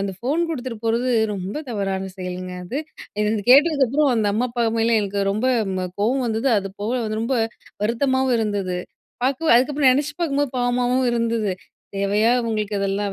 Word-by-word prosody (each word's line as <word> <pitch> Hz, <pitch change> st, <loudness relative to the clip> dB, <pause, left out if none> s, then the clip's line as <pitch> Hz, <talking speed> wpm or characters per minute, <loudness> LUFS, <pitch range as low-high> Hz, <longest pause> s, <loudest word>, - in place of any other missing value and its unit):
அந்த 195 Hz, -1 st, -2 dB
ஃபோன் 280 Hz, -, 0 dB
குடுத்துட்டு 255 Hz, -7 st, -4 dB
போறது, 235 Hz, +3 st, +1 dB, 0.3 s
ரொம்ப 190 Hz, +4 st, -5 dB
தவறான 195 Hz, -4 st, -2 dB
செயல்ங்க 180 Hz, 0 st, -5 dB
அது. 245 Hz, +10 st, -4 dB, 0.4 s
இது 210 Hz, -, +2 dB
இது 220 Hz, -, -1 dB
கேட்டதுக்கப்புறம், 285 Hz, -1 st, +5 dB
அந்த 220 Hz, -2 st, +1 dB
அம்மா, 230 Hz, +5 st, +1 dB
அப்பா 240 Hz, 0 st, 0 dB
மேல 230 Hz, +1 st, +3 dB
எனக்கு 200 Hz, 0 st, -2 dB
ரொம்ப 215 Hz, +5 st, -1 dB, 0.2 s
ம் 185 Hz, -1 st, -2 dB
அ -, -, -2 dB
கோவம் 255 Hz, +6 st, +1 dB
வந்தது, 225 Hz, +4 st, 0 dB
அது 195 Hz, 0 st, -4 dB
போக 220 Hz, +3 st, -1 dB
வந்து 215 Hz, 0 st, -2 dB
ரொம்ப 260 Hz, +3 st, 0 dB, 0.5 s
வருத்தமாவும் 260 Hz, +2 st, +1 dB
இருந்தது. 200 Hz, -4 st, -1 dB, 0.5 s
பார்க்கு 280 Hz, +5 st, +2 dB
அதுக்கப்புறம், 275 Hz, +2 st, +3 dB
நெனைச்சு 290 Hz, +3 st, 0 dB
பார்க்கும்போது 285 Hz, -4 st, 0 dB
பாவமாகவும் 245 Hz, +1 st, +1 dB
இருந்தது. 230 Hz, -3 st, 0 dB, 0.5 s
"தேவையா 205 Hz, +3 st, +2 dB, 0.2 s
உங்களுக்கு 215 Hz, -2 st, -2 dB
இதெல்லாம் 200 Hz, 0 st, -1 dB
230 Hz, 165 wpm, -22 LUFS, 205-260 Hz, 0.5 s, கேட்டதுக்கப்புறம்